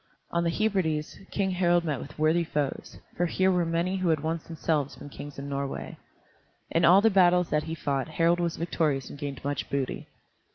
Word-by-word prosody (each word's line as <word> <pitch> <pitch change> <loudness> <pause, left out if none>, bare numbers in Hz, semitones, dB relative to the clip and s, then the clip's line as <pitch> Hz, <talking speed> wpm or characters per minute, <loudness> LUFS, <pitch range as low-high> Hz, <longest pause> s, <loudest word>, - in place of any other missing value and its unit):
On 170 0 +1
the 170 - +1
Hebrides 165 -6 0
King 195 -2 0
Harald 175 -1 +3
met 150 -5 -2
with - - -10
worthy 155 +3 +3
foes, 150 -4 -3 0.2
for 175 - +1
here 190 +3 +2
were 175 -2 +1
many 170 +3 0
who 185 -2 0
had 155 -3 +2
once 160 +1 -1
themselves 155 -3 -1
been 145 - -10
kings 145 0 -9
in 140 +1 -6
Norway. 140 -1 -4 0.8
In 165 0 +3
all 185 +4 +7
the 225 +1 +4
battles 180 -2 +4
that 150 0 +1
he 160 - -2
fought 140 -3 -1
Harald 165 +2 +2
was 170 -1 -1
victorious 155 -6 -1
and 145 - -10
gained 140 -2 -5
much 145 0 -2
booty. 140 -2 -2
165 Hz, 200 wpm, -27 LUFS, 145-175 Hz, 0.8 s, all